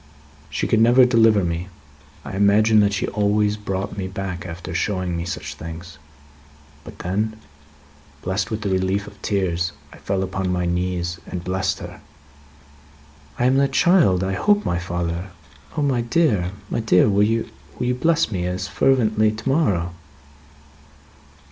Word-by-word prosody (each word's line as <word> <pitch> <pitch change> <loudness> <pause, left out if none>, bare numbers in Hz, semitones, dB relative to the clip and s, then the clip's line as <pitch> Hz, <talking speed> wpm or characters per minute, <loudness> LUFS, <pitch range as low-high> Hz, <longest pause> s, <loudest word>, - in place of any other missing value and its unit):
She 75 - -2
could 110 - +2
never 120 +3 +6
deliver 115 -4 +4
me; 85 +1 -2 0.6
I - - -6
imagined 105 +2 +4
that 100 0 +2
she 100 - -1
always 105 0 +1
brought 100 -1 -4
me 95 - -2
back 95 -2 -5
after 85 0 -7
showing 95 -1 -1
me 85 0 -3
such 75 -5 -5
things. 80 +1 -9 0.8
But - - -11
then, 105 +5 -2 0.9
blessed 95 +1 -1
with 110 -1 -3
the 105 - -2
relief 95 +2 0
of 105 -1 -14
tears, 90 -4 -1 0.2
I - - -13
fell 95 -1 -1
upon 95 0 -2
my 90 -1 0
knees, 90 0 -2
and 90 -1 -5
blessed 95 +1 -1
her." - - -9 1.4
"I 120 - +1
am 130 +1 +4
that 135 -1 +2
child, 145 - +4
I 95 0 -1
hope, 205 - +2
my 85 - 0
father. 85 +1 -3 0.5
O 150 - +1
my 130 -4 +1
dear, 115 - +1 0.2
my - - 0
dear, 110 -5 +4
will 100 -1 +3
you 115 +2 +2 0.5
bless 165 +2 +1
me 90 -3 -2
as 90 0 -3
fervently 110 -5 +2
to 110 +4 -7
morrow?" 100 - +1
95 Hz, 155 wpm, -22 LUFS, 90-110 Hz, 1.4 s, never